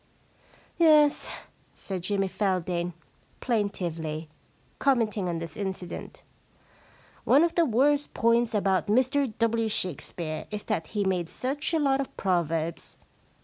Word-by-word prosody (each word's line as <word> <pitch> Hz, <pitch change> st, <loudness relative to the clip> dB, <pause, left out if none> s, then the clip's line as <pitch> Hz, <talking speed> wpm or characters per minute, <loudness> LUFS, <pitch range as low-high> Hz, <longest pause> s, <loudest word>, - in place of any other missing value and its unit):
* -, -, -30 dB
Yes/ 300 Hz, -1 st, +4 dB, 0.5 s
said 190 Hz, -2 st, -5 dB
Jimmy 195 Hz, +1 st, 0 dB
Feldane 180 Hz, -3 st, -1 dB, 0.5 s
plaintively, 165 Hz, -9 st, -2 dB, 0.5 s
commenting 220 Hz, -8 st, +1 dB
on 170 Hz, -, -2 dB
this 165 Hz, -1 st, -6 dB
incident, 190 Hz, -3 st, -6 dB, 0.5 s
* -, -, -29 dB, 0.2 s
one 290 Hz, -, +5 dB
of 340 Hz, -, +1 dB
the 340 Hz, -, +3 dB
worst 285 Hz, +5 st, +2 dB
points 230 Hz, 0 st, +2 dB
about 195 Hz, -2 st, +1 dB
Mr 260 Hz, +4 st, +2 dB
W. 230 Hz, -1 st, +1 dB
Shakespeare 165 Hz, -4 st, -3 dB
is 210 Hz, -1 st, -5 dB
that 160 Hz, -, -2 dB
he 205 Hz, -, +2 dB
made 180 Hz, -3 st, 0 dB
such 280 Hz, +5 st, -2 dB
a 330 Hz, -, +2 dB
lot 275 Hz, -2 st, +2 dB
of 270 Hz, -, -8 dB
proverbs. 170 Hz, -3 st, -1 dB
205 Hz, 130 wpm, -27 LUFS, 175-255 Hz, 0.5 s, one